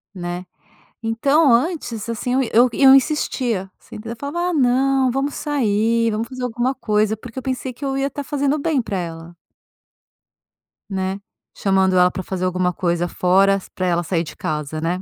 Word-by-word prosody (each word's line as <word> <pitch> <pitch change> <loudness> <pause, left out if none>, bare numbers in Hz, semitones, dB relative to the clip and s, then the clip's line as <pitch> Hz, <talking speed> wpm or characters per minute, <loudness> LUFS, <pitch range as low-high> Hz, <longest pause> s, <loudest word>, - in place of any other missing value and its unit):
Né? 175 0 -5 0.6
Então, 275 +6 +3
antes 240 - -1
assim, 230 +2 -2
eu - - +3
eu 245 +3 +6
eu 270 +2 +7
insistia, 250 -8 0
se - - -14
entend 225 +2 -7
Eu 235 - -5
falava: 345 +7 -2
"Ah - - -3
não, 265 -1 +2
vamos 275 +3 -1
sair, 230 -5 +1
vamos 220 +2 -2
fazer 255 -1 -6
alguma 245 +2 -1
coisa", 215 -3 0
porque 235 +3 -12
eu 260 - -4
pensei 260 -1 -3
que 245 - -12
eu 270 -1 -1
ia 275 +1 0
tá 285 - -6
fazendo 285 +1 0
o 305 - -3
bem 295 -4 +1
pra 200 -3 -4
ela. 165 -1 -6 1.5
Né? 190 0 -2 0.4
Chamando 190 -1 +2
ela 180 0 +5
pra 185 - -4
fazer 185 0 -3
alguma 180 0 0
coisa 175 0 0
fora, 195 +3 +3
pra 185 - -2
ela 175 0 +1
sair 170 -1 -1
de 160 - -10
casa, 150 0 -3
né? 175 +3 -1
225 Hz, 185 wpm, -20 LUFS, 185-270 Hz, 1.5 s, eu